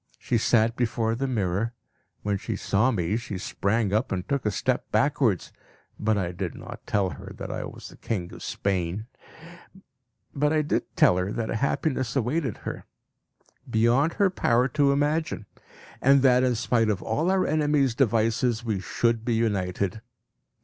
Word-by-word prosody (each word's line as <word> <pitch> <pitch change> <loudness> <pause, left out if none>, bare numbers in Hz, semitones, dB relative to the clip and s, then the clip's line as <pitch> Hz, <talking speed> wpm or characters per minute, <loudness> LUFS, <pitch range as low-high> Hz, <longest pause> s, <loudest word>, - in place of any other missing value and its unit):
She 120 - 0
sat 115 0 +3
before 115 -2 0
the 135 +4 -2
mirror. 110 0 -1 0.5
When 100 -1 0
she - - -3
saw 105 +6 +2
me, 100 -3 0
she 115 -5 -5
sprang 100 +3 -1
up 110 +5 +1
and 90 -1 -2
took 140 -5 -1
a - - +4
step 125 +5 -1
backwards; 135 - +1 0.5
but 110 0 +1
I 90 -3 -1
did 90 -2 -4
not - - -10
tell 100 -3 +1
her - - -9
that - - -5
I - - -4
was - - -9
the - - -15
king 90 -6 -4
of - - -10
Spain. 95 +1 -2 1.3
But 145 +2 +1
I 155 -1 +2 0.3
told 90 - +5
her 90 +2 -2
that 115 -1 -2
a - - -1
happiness 130 -1 -1
awaited 135 - 0
her, - - -5 0.8
beyond 120 +8 +3
her 200 -3 +2
power 125 -7 +2
to 140 0 +3
imagine; 145 -3 0 0.6
and 135 0 +5
that 125 -1 +5
in 125 -1 +2
spite 115 -1 +1
of 100 -3 -1
all 150 +11 0
our 190 0 +2
enemies' 150 -4 +2
devices 115 -1 +1
we 110 -4 -1
should 115 +4 0
be 120 -1 0
united. 100 -2 -1
115 Hz, 165 wpm, -26 LUFS, 100-135 Hz, 1.3 s, told